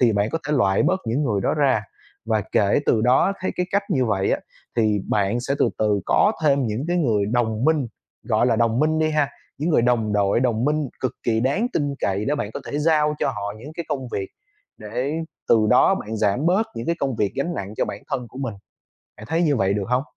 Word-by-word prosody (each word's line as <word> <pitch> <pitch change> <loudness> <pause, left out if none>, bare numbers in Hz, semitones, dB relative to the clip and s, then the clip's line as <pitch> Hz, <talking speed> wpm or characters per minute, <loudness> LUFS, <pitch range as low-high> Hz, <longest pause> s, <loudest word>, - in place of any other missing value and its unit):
thì 120 -3 +4
bạn 100 +3 0
có 165 - -1
thể - - +1
loại 95 -5 +3
bớt 185 +1 +1
những 120 +6 0
người 105 -6 0
đó - - +1
ra. 135 -7 +2 0.4
Và 110 -2 +1
kể 100 +7 +3
từ 110 - +3
đó 125 - +4
thấy 185 - -1
cái 180 - 0
cách 200 +1 +2
như 135 -7 +2
vậy 95 -3 0
á - - 0 0.4
thì 110 -3 +2
bạn 105 +3 +1
sẽ 135 +3 -1
từ - - +3
từ 105 -2 +2
có 210 - +4
thêm 140 -4 +3
những 110 +5 -2
cái 175 - +1
người 110 -10 +1
đồng 110 0 0
minh, 155 -4 +2 0.4
gọi 115 0 +2
là, 115 -3 +2
đồng 115 0 +2
minh 155 +1 +2
đi 155 0 +2
ha, 150 -2 +1 0.3
những 155 +5 -1
người 155 - +3
đồng 115 -3 +1
đội, 100 +2 +2
đồng 120 -2 +1
minh 150 0 0
cực 130 - -1
kỳ 110 -2 +1
đáng 140 - +1
tin 145 -2 -1
cậy 100 +2 0
để 145 - 0
bạn 105 -8 -3
có - - -4
thể 145 - -3
giao 150 -1 +2
cho - - 0
họ 100 -5 -4
những 140 +7 -10
cái 170 - -4
công 135 -4 -3
việc, 95 -1 -3 0.5
để 120 +7 -3 0.4
từ 110 -2 +4
đó - - +5
bạn 110 +2 -5
giảm 110 +7 +1
bớt 195 +6 +3
những 115 +1 -5
cái 170 - 0
công 135 -4 -1
việc 105 -2 0
gánh 165 +6 -1
nặng 100 - -5
cho - - +1
bản 100 - -7
thân 125 -2 -2
của 130 - -11
mình. 130 -6 -3 0.6
Bạn 105 - -11
thấy 165 +5 0
như 150 -5 +2
vậy 95 -1 +1
được 100 -2 -2
hông? 125 +1 +2
125 Hz, 245 wpm, -22 LUFS, 105-150 Hz, 0.6 s, đó